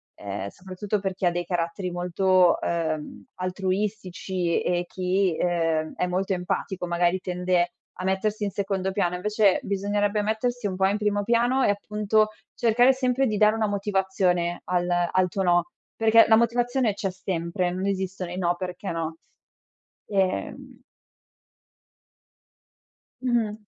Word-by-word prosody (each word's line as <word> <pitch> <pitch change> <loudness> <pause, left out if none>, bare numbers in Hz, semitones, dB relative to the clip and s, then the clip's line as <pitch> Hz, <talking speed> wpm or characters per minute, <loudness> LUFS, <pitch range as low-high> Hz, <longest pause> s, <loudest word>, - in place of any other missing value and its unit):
ehm, 100 -1 -5
soprattutto 190 - -4
per 195 -1 -2
chi 185 0 -3
ha - - +3
dei 175 0 -3
caratteri 175 +1 -2
molto, 180 +1 +3
uhm, 160 -3 -3
altruistici 185 -1 -2
e 175 0 +1
e 175 - -3
chi, 185 -1 0
ehm, 165 -3 0
è 180 - 0
molto 190 +2 -1
empatico, 185 0 -3
magari 175 +1 +1
tende 180 -1 0 0.2
a 185 - -8
mettersi 205 +3 0
in 200 - 0
secondo 195 -1 -2
piano, 185 -3 0
invece 210 +1 +2
bisognerebbe 205 +1 0
mettersi 225 +2 -1
un 185 - -3
po' 190 +1 +3
in 200 +2 +1
primo 205 -1 0
piano 240 +4 +2
e - - +3
appunto 210 +1 +1 0.3
cercare 240 +3 +4
sempre 260 0 +1
di 215 -2 -1
dare 210 +1 +5
una 220 -1 0
motivazione 190 -3 0
al 175 -1 0 0.2
al 185 0 +3
tuo 195 +2 -2
no, 175 -1 +3 0.3
perché 225 0 +6
la 220 - +6
motivazione 240 0 +1
c'è 195 -2 -2
sempre, 180 0 -2
non 185 +2 -3
esistono 190 -2 -3
i 180 - -5
no, 175 -1 +1
perché 180 +1 -5
no. 165 -1 -3 0.9
Ehm 190 -2 -2 2.4
Mh-mh. 235 -4 0
190 Hz, 145 wpm, -25 LUFS, 180-210 Hz, 2.4 s, perché